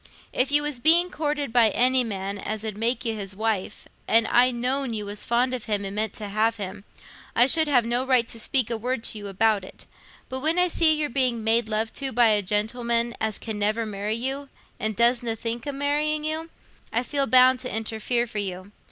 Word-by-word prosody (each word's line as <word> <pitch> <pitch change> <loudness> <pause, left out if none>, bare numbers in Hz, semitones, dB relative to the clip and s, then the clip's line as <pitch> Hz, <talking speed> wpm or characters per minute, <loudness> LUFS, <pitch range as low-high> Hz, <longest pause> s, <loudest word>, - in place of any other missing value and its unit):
If 260 +2 +1
you 295 0 +4
was 295 -4 -3
being 340 +6 +4
courted 295 -6 -3
by 235 -3 +5
any 255 +4 +2
man 200 -2 -4
as 215 +1 -5
'ud 215 -2 -4
make 235 +4 -1
you 225 - 0
his 200 -3 -5
wife, 215 -2 -3 0.2
and 225 0 +4
I'd 250 +1 +4
known 255 0 -1
you 210 -1 -4
was 205 0 -5
fond 245 +2 +1
of 250 -4 -4
him 205 -2 -1
and 195 +1 -5
meant 215 -1 -1
to 210 - -6
have 220 +3 +1
him, 200 -1 -7 0.5
I 240 - +6
should 315 +4 +3
have 250 -5 +3
no 240 +2 0
right 255 -3 +2
to 230 - -6
speak 245 0 +2
a 230 - 0
word 245 0 -3
to 215 - -3
you 205 - -7
about 205 +1 +1
it; 185 - -13 0.4
but 260 - -4
when 315 +5 0
I 360 0 +3
see 320 -2 +4
you're 300 -1 -1
being 250 -3 0
made 225 0 +2
love 220 +1 -1
to 270 -1 -2
by 235 -1 +4
a 210 -1 +3
gentleman 235 +4 0
as 220 -2 0
can 220 -2 -6
never 215 +2 0
marry 210 +1 -3
you, 270 +4 -3 0.3
and 215 0 -2
doesna 235 -1 +2
think 230 +3 -5
o' - - -1
marrying 295 +2 -1
you, 315 +2 -2 0.4
I 235 - 0
feel 275 +1 -1
bound 255 0 +5
t' 255 0 -5
interfere 225 +2 -1
for 220 -3 -5
you. 190 0 -5
235 Hz, 220 wpm, -24 LUFS, 215-260 Hz, 0.5 s, I